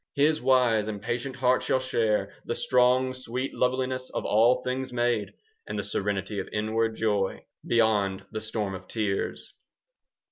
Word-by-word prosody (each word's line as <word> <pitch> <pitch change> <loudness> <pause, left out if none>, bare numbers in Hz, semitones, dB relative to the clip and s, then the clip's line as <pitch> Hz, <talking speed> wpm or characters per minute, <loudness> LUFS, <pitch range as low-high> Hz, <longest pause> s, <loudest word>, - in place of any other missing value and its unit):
His 150 +2 +3
wise 125 -4 +3
and 105 -2 -4
patient 120 +5 -3
heart 130 -1 +2
shall 130 - +1
share 110 -6 0
The 120 - -2
strong 125 +1 +3
sweet 130 +1 -4
loveliness 130 0 -1
of - - -4
all 115 +4 +4
things 130 0 -3
made, 120 -3 +1
10 - - -20 0.3
And - - -4
the - - -2
serenity 100 0 -2
of 95 - -4
inward 110 +1 0
joy 105 -3 0 0.2
Beyond 105 -5 +2
the 110 -1 -4
storm 110 -2 -3
of 95 0 -8
tears. 105 -3 -2
115 Hz, 155 wpm, -27 LUFS, 105-130 Hz, 0.3 s, all